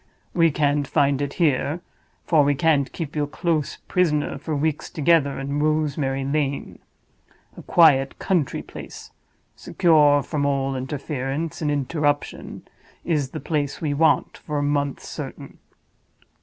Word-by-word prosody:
We 165 -1 +4
can't 145 -1 0
find 140 -2 +2
it 140 -1 -2
here—for 155 0 0
we 145 0 +2
can't 145 -3 +2
keep 160 -4 -6
you 150 - 0
a - - -10
close 155 0 -1
prisoner 150 -6 0
for 155 +2 -3
weeks 150 +1 -1
together 150 -2 +2
in 140 +2 -3
Rosemary 150 -3 0
Lane. 140 0 -2 0.8
A - - -10
quiet 140 -6 +4
country 175 -8 -1
place, - - -10 0.4
secure 150 -4 +3
from 150 -3 -2
all 135 -1 0
interference 140 +3 -4
and 150 - 0
interruption, 145 +1 -2 0.4
is 150 -6 0
the - - -6
place 145 -1 -2
we 150 -3 -1
want 160 +2 +2
for 150 -2 -4
a 145 - 0
month 145 -1 -1
certain. - - -8
145 Hz, 135 wpm, -23 LUFS, 140-155 Hz, 0.8 s, We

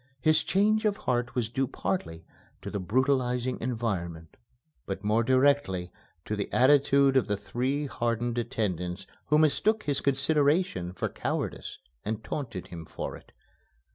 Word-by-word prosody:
His 155 +4 +4
change 215 +3 +2
of 205 -1 +2
heart 120 -1 -1
was 120 -3 0
due 130 +3 -1
partly 85 -6 -3 0.4
to - - -5
the 100 - -2
brutalizing 125 +3 +1
environment, 95 -10 -3 0.5
but - - -4
more 105 +2 +3
directly 130 -9 +2 0.3
to 105 - -2
the 100 -1 -4
attitude 140 +1 +5
of 130 - +3
the 105 -1 0
three 130 +7 -2
hardened 120 -2 -1
attendants 100 -7 -2 0.2
who 150 - +4
mistook 210 +8 +3
his 145 -2 -1
consideration 140 - +1
for 95 - -2
cowardice - - -4 0.3
and 110 +1 -3
taunted 110 -8 -5
him 85 -2 -7
for - - -6
it. - - -15
125 Hz, 140 wpm, -28 LUFS, 105-140 Hz, 0.5 s, attitude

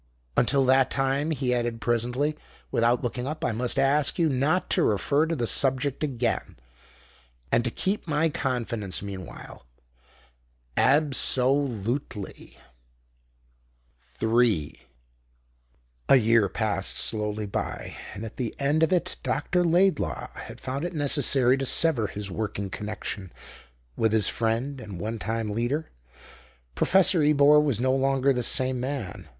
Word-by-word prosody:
"Until 135 +2 +3
that 130 0 +4
time," 135 +3 0
he 135 -5 -1
added 120 -1 -2
presently, 125 +6 0 0.4
without 120 +1 +2
looking 125 +1 -3
up, 155 +2 -4
"I - - +1
must 120 +4 0
ask 140 +1 +2
you 165 -3 +2
not 140 +7 +1
to - - +4
refer 140 +9 +2
to 165 - -1
the 120 -5 -1
subject 135 +3 +1
again 125 - -2 0.9
and 120 - +3
to - - 0
keep 190 - -3
my 155 +1 +1
confidence 115 - -3
meanwhile 95 -10 -9 1.1
ab 145 +1 +3
so 130 0 +3
lute 130 -2 -2
ly." 100 -2 -9 1.5
3 110 - 0 1.3
A - - +8
year 115 -4 +4
passed 105 -3 -2
slowly 105 -1 -1
by, 100 - -5 0.2
and 110 - -6
at 110 - -10
the 120 -4 -3
end 145 +3 +1
of 160 - +3
it 180 -2 0
Dr. 175 +6 0
Laidlaw 175 -1 +1
had - - -10
found 135 +3 -4
it 175 0 -4
necessary 135 -3 +3
to 135 - -2
sever 135 -10 +2
his 100 0 -6
working 100 -1 -4
connexion 105 -2 -6 0.6
with 110 -1 +1
his 110 -3 +2
friend 120 +4 -1
and 100 -5 -8
one 110 +4 -4
time 110 +2 -3
leader. 120 +9 -2 0.8
Professor 185 - +3
Ebor 150 0 +5
was 140 -7 0
no 130 +1 +1
longer 135 0 +2
the 125 - -1
same 130 +1 0
man. 130 -5 -5
125 Hz, 140 wpm, -26 LUFS, 110-145 Hz, 1.5 s, A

